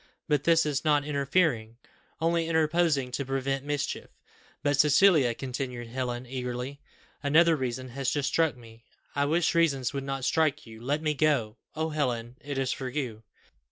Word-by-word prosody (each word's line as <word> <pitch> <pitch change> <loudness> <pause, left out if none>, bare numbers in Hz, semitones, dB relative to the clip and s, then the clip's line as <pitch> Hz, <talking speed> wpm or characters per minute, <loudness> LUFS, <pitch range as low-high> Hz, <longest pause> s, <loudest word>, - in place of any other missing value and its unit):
"But 145 -2 +1
this 165 -1 +4
is 145 -2 -1
not 150 -2 +3
interfering, 140 -5 0 0.4
only 165 0 +1
interposing 160 -4 +2
to 140 - -2
prevent 135 0 -2
mischief." 145 0 -3 0.5
"But, 145 -1 +1
Cecilia," 150 - +5
continued 125 -2 -5
Helen 125 0 -3
eagerly, 125 +2 -5 0.4
"another 160 +3 +5
reason 130 -2 -3
has 130 +1 -2
just 145 -2 0
struck 160 -5 +1
me." 115 -1 -15 0.3
"I 140 - +2
wish 165 +3 +2
reasons 140 -7 +2
would 140 -1 -3
not 135 -1 -3
strike 160 -3 +1
you. 110 -1 -12
Let 145 +5 -1
me 155 -1 +1
go. 135 -7 +1 0.2
Oh, 160 +1 -1
Helen; 125 -6 -2
it 140 -1 -5
is 135 -1 0
for 130 - -4
you." 125 -5 -4
140 Hz, 160 wpm, -28 LUFS, 125-155 Hz, 0.5 s, Cecilia